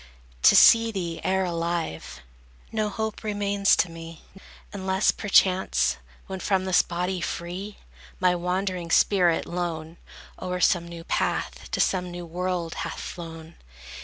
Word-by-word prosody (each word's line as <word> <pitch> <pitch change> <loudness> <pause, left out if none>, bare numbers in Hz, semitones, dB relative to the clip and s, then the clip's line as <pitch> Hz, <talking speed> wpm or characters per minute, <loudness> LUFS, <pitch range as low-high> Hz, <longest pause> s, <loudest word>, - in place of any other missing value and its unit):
To - - +7
see 230 0 +7
thee 175 -5 -4
e'er 190 0 +1
alive, 165 - -3 0.5
No 215 -1 -1
hope 220 +2 -4
remains 205 -1 +2
to 175 - 0
me; 165 -1 -10 0.5
Unless 190 0 +1
perchance, 190 -2 +2 0.3
when 190 -1 -6
from 190 0 0
this 185 -1 +4
body 180 +1 -3
free, 180 +5 -5 0.4
My 180 -1 +3
wandering 180 0 -2
spirit, 175 -1 +3
lone, 170 -2 -4 0.4
O'er 180 0 -3
some 175 -1 +2
new 170 -1 -9
path, - - -2
to - - -3
some 180 -2 +1
new 175 0 -7
world 175 0 -3
hath 165 - -5
flown. 165 -1 -8
180 Hz, 130 wpm, -25 LUFS, 170-190 Hz, 0.5 s, To